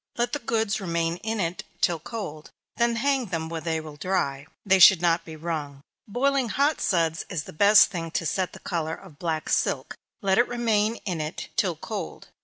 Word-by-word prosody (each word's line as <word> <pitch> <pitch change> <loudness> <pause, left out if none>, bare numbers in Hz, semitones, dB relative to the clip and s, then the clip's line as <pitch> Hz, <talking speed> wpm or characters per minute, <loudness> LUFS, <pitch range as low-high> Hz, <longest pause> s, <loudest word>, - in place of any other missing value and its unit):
Let 240 0 0
the 290 - 0
goods 220 -4 -1
remain 170 -2 -1
in 220 +3 -3
it 175 -1 -2 0.2
till 170 -3 +2
cold; 165 -6 -7 0.3
then 235 0 +2
hang 265 0 +1
them 160 -3 -3
where 165 -1 -4
they 160 0 -1
will 155 -2 -9
dry; 145 -5 -1 0.2
(they 190 -1 +4
should 185 0 +9
not 170 0 +2
be 160 - -8
wrung.) 150 -4 -5 0.2
Boiling 260 +3 +1
hot 285 +7 +1
suds 165 -3 +1
is 170 -6 -3
the - - -11
best 200 +5 +6
thing 165 -4 -4
to 165 - -3
set 185 +3 -1
the - - -10
color 165 -2 -2
of 170 -7 -15
black 160 -3 -2
silk - - 0 0.3
let 195 +1 +3
it 240 - +4
remain 225 -2 +1
in 175 -6 -2
it 155 0 -5
till - - +1
cold. - - -6
180 Hz, 200 wpm, -26 LUFS, 160-220 Hz, 0.3 s, should